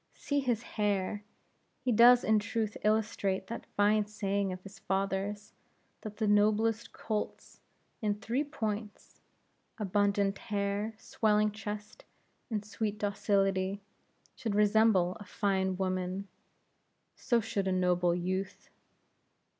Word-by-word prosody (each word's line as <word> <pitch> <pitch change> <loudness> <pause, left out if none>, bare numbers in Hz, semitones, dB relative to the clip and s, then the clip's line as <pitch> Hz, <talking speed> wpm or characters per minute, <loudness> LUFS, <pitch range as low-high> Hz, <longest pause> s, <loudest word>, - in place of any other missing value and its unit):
See 285 0 -1
his 240 -4 0
hair! 205 -2 -1 0.6
He 255 -1 0
does 240 +2 +7
in 220 0 +4
truth 215 0 -2
illustrate 210 -3 +1
that 230 - -7
fine 205 +1 +3
saying 200 -2 -1
of 185 0 -7
his 195 +1 -12
father's, 195 +1 -2 0.5
that 215 - -6
as - - -29
the 220 - 0
noblest 215 +2 +2
colts, 215 -2 -4 0.4
in 210 -2 +1
three 230 +6 -1
points 220 -7 -5 0.6
abundant 200 -1 +1
hair, 205 0 -2
swelling 215 -1 +1
chest, 210 - -7 0.5
and 210 -3 -2
sweet 210 -1 -3
docility 195 -1 0 0.5
should 220 -5 -3
resemble 210 -3 +4
a - - -8
fine 190 -2 0
woman, 185 +1 -2 0.9
so 240 - +1
should 205 -3 -2
a - - +1
noble 180 -1 +2
youth. 185 +2 -3
205 Hz, 120 wpm, -31 LUFS, 195-220 Hz, 0.9 s, does